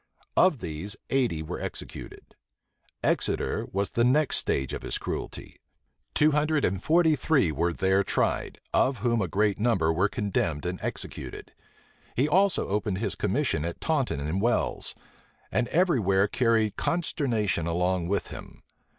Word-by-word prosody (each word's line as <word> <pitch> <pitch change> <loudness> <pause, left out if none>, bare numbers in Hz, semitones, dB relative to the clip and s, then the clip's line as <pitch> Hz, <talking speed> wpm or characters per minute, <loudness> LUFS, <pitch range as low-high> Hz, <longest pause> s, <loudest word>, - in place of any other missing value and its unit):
Of 160 -9 +4
these, 85 +6 -5 0.2
eighty 120 -13 +1
were 80 - -5
executed. - - -8 0.7
Exeter - - 0
was 100 +1 -1
the 115 - +1
next 140 +5 +4
stage 65 -1 0
of - - -4
his - - -2
cruelty: - - -5 0.6
two 150 +1 +4
hundred 150 0 +2
and 95 0 -1
forty 160 +2 +4
three 135 - +2
were 85 +4 0
there 95 +3 +2
tried, - - -1 0.2
of 130 -1 +3
whom 115 -2 +2
a 95 - 0
great 105 +1 +1
number 105 -8 +2
were 95 +5 +2
condemned 90 -9 -1
and 90 +1 -3
executed. - - -6 0.6
He 135 +4 +2
also 190 +3 +2
opened 100 -1 -1
his 100 -2 -1
commission 75 - 0
at 85 0 -4
Taunton 140 - 0
and 75 +7 -2
Wells; 120 +2 0 0.6
and 120 - +1
every 175 -5 +2
where 95 0 +3
carried 115 -3 +1
consternation 120 - 0
along 90 +1 0
with 100 +2 -1
him. - - -10
105 Hz, 150 wpm, -27 LUFS, 90-135 Hz, 0.7 s, Of